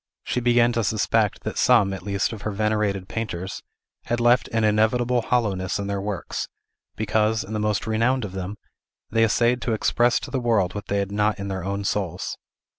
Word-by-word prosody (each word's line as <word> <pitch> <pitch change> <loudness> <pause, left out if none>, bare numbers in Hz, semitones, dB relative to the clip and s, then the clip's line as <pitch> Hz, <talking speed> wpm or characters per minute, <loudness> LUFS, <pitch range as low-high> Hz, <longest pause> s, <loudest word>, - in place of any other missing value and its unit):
She - - -1
began 120 0 +4
to 115 -1 0
suspect 105 +1 +1
that - - -3
some, 110 -6 +4
at 95 - -6
least, 100 +4 -1
of 110 - -8
her 110 - -2
venerated 105 -2 0
painters, 95 -5 -4 0.4
had 120 - -1
left 120 +2 +4
an 115 -1 0
inevitable 115 +3 +2
hollowness 100 -7 0
in 100 - -3
their 100 -1 -2
works, 100 -3 -4 0.5
because, 110 +1 +1
in 105 - -8
the 110 - -1
most 105 +1 0
renowned 115 +2 +1
of 100 - -7
them, 95 +2 -5 0.6
they 115 +1 +3
essayed 120 +3 +2
to 115 - -1
express 120 +2 +2
to - - -8
the 135 - 0
world 110 -7 +1
what 105 -1 -6
they 100 - 0
had 100 0 -1
not 105 +1 +1
in 100 0 -5
their 95 -2 -3
own 100 +1 -2
souls. 95 -3 -2
105 Hz, 195 wpm, -24 LUFS, 100-115 Hz, 0.6 s, began